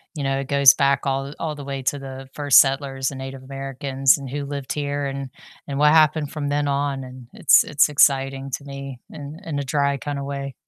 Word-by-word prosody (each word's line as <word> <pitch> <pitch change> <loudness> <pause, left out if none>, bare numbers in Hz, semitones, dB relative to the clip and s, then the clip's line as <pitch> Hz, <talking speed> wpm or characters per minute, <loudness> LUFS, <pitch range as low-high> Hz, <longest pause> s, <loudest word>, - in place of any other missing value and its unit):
you 145 - -4
know, 135 0 0
it 135 - -5
goes 140 -2 +6
back 140 0 +1
all 135 +1 -2
all 155 -2 -3
the 145 - -9
way 135 -1 -4
to 140 +2 0
the 135 -1 -9
first 145 -2 +6
settlers 135 -1 +1
and 135 - -8
Native 135 0 -7
Americans 135 0 0
and 135 - -8
who 145 +2 -4
lived 140 -2 -5
here 145 -1 -3
and 135 -1 -5 0.4
and 140 0 -4
what 150 0 +5
happened 155 -2 +3
from 145 -2 -4
then 145 0 0
on, 140 -1 -1
and 130 -1 -11
it's - - +5
it's 150 0 +2
exciting 135 -1 +2
to - - -18
me 140 -2 -8
in 150 0 -9
in 155 -3 -4
a 140 - -2
dry 140 +1 0
kinda 140 +1 -5
way. 140 -1 -5
140 Hz, 220 wpm, -22 LUFS, 135-145 Hz, 0.4 s, goes